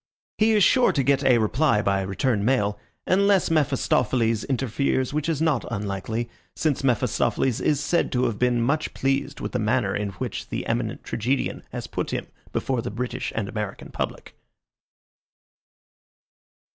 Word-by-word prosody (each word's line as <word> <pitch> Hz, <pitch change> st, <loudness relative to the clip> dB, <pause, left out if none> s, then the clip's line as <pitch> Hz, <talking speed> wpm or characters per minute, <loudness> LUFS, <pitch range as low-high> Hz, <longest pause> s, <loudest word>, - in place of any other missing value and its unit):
He 220 Hz, +1 st, +4 dB
is 210 Hz, -2 st, +4 dB
sure 255 Hz, +5 st, +5 dB
to 140 Hz, -, +1 dB
get 140 Hz, +1 st, +2 dB
a 125 Hz, -2 st, +5 dB
reply 110 Hz, 0 st, +2 dB
by 100 Hz, 0 st, +1 dB
return 100 Hz, +3 st, 0 dB
mail, 105 Hz, -4 st, +1 dB, 0.3 s
unless 195 Hz, -1 st, +3 dB
Mephistopheles 125 Hz, -6 st, +2 dB
interferes, 130 Hz, +1 st, 0 dB
which 150 Hz, +2 st, -1 dB
is 160 Hz, -1 st, 0 dB
not 160 Hz, -3 st, +2 dB
unlikely, 105 Hz, +2 st, -3 dB, 0.3 s
since 150 Hz, -4 st, 0 dB
Mephistopheles 125 Hz, 0 st, +1 dB
is 150 Hz, -2 st, +2 dB
said 170 Hz, +3 st, +1 dB
to 125 Hz, 0 st, +1 dB
have 115 Hz, -5 st, -1 dB
been 125 Hz, -1 st, +2 dB
much 150 Hz, +5 st, 0 dB
pleased 135 Hz, +1 st, -1 dB
with -, -, -3 dB
the -, -, -1 dB
manner 110 Hz, -3 st, +1 dB
in 105 Hz, 0 st, -1 dB
which -, -, -5 dB
the -, -, -3 dB
eminent -, -, -2 dB
tragedian 130 Hz, +5 st, -1 dB
has -, -, -5 dB
put -, -, -3 dB
him -, -, -3 dB, 0.3 s
before 130 Hz, -3 st, -1 dB
the -, -, -4 dB
British 125 Hz, +4 st, -3 dB
and 110 Hz, -3 st, -1 dB
American 105 Hz, -2 st, -5 dB
public. -, -, -5 dB
125 Hz, 155 wpm, -24 LUFS, 110-145 Hz, 0.3 s, sure